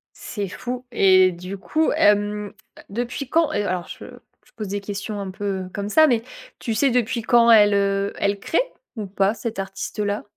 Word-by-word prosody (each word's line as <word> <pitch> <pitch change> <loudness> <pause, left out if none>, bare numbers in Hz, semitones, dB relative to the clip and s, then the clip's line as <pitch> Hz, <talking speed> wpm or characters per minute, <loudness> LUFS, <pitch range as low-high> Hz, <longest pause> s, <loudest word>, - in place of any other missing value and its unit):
C'est 205 -5 -5
fou 250 +6 -6
et 185 -4 +5
du 180 +3 -7
coup 310 +11 0
hem, 205 0 +2 0.4
depuis 245 +5 -4
quand 330 +1 +2
et 205 - 0
alors 180 -3 -2
je - - -9 0.4
je - - -25
pose 215 -2 -4
des 200 +1 -3
questions 205 +1 -5
un 195 -1 -5
peu, 205 +2 -7 0.2
heu, 185 - -7
comme 200 0 -3
ça, 315 +9 +5
mais 235 -5 +1 0.4
tu 230 - -3
sais 270 +6 +3
depuis 240 -1 0
quand 235 +1 +4
elle, 210 -2 +7
heu, 200 0 +1
elle 200 0 0
crée 325 - 0 0.4
ou 215 - -3
pas 195 +1 +1
cette 230 -2 -5
artiste 195 +2 -5
là? 205 0 -1
205 Hz, 195 wpm, -22 LUFS, 195-235 Hz, 0.4 s, elle